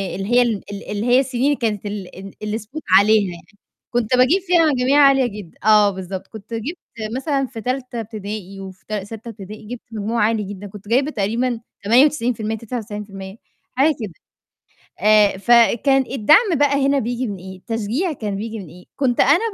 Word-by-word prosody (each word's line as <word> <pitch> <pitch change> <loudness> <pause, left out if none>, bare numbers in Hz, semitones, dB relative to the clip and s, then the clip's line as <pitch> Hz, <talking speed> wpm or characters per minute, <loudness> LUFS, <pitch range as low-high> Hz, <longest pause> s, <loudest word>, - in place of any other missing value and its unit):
اللي 195 - -4
هي 250 - +7
ال 235 -3 +2 0.2
ال 200 - -7
ال - - -8
اللي 210 +2 -2
هي 245 +1 +5
السنين 270 +2 +1
كانت 215 -5 -2
ال 200 -3 -6
ال 195 0 -10
اللي 215 +1 -2
spot 270 +9 -9 0.2
عليها 205 -2 +3
يعني، 185 +4 -16 0.3
كنت 240 0 +1
باجيب 285 +10 +4
فيها 350 -3 +3
مجاميع 260 +3 +3
عالية 270 -2 +5
جدًا، 170 -4 -17
آه، 210 -1 +6
بالضبط، 190 0 -6
كنت 220 +1 -11
جبت 265 +11 -4 0.4
مثلًا 275 -1 -1
في 230 -3 -8
تالتة 250 0 -3
ابتدائي 205 -3 -7
وفي 190 -1 -11
ت 215 - -6
سَتّة 215 +3 -6
ابتدائي 210 0 -10
جبت 245 0 -7
مجموع 220 +1 -1
عالي 220 0 +1
جدًا، 200 0 -8
كنت 205 +1 -12
جايبة 265 +7 +2
تقريبًا 230 +2 -1 0.2
98%، 250 +3 +4
99%، 210 -3 -6 0.4
حاجة 290 +2 +4
كده. 200 -6 -5 0.9
آآ 210 -1 +4
فكان 240 +5 +4
الدعم 310 - +4
بقى 280 -1 +2
هنا 280 0 +2
بييجي 245 +1 -2
من 200 -2 -5
إيه، 190 +1 -10
التشجيع 230 - -2
كان 210 -6 -4
بييجي 220 +2 -5
من 190 - -9
إيه؟ 180 +2 -15
كنت 255 -4 0
أنا 290 +5 +5
225 Hz, 180 wpm, -20 LUFS, 205-255 Hz, 0.9 s, هي